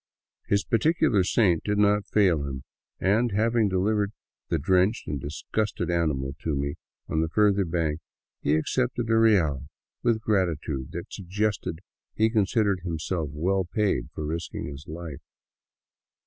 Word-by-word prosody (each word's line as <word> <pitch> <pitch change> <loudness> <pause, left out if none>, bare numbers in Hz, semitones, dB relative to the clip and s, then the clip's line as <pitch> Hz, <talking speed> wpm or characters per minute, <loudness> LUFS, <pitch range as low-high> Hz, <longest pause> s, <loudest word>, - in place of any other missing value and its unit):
His 100 0 +2
particular 130 - +2
saint 90 -3 +2
did 105 0 0
not 105 0 +3
fail 95 -7 +3
him 65 -2 -5 0.4
and, 110 +6 +2
having 110 0 +2
delivered 100 +2 +1 0.4
the 85 - +1
drenched 95 +7 +2
and 70 -2 -3
disgusted 85 - -2
animal 75 -6 0
to 80 -3 -2
me 70 +1 -1 0.3
on 80 - 0
the 80 - 0
further 100 +1 +3
bank, 80 -2 -1 0.4
he 75 - +2
accepted 120 +7 0
a - - +4
real 80 - +3 0.3
with 120 -1 +3
a - - -6
gratitude 85 -11 -1
that - - -7
suggested 100 -2 -2 0.3
he 110 +1 +3
con 110 -3 +3
sidered 100 -4 +1
himself 80 -2 -3
well 95 +6 0
paid 95 - 0
for 75 - -4
risking 80 +3 -4
his 75 +1 -8
life. 80 -2 -7
95 Hz, 150 wpm, -26 LUFS, 80-105 Hz, 0.4 s, a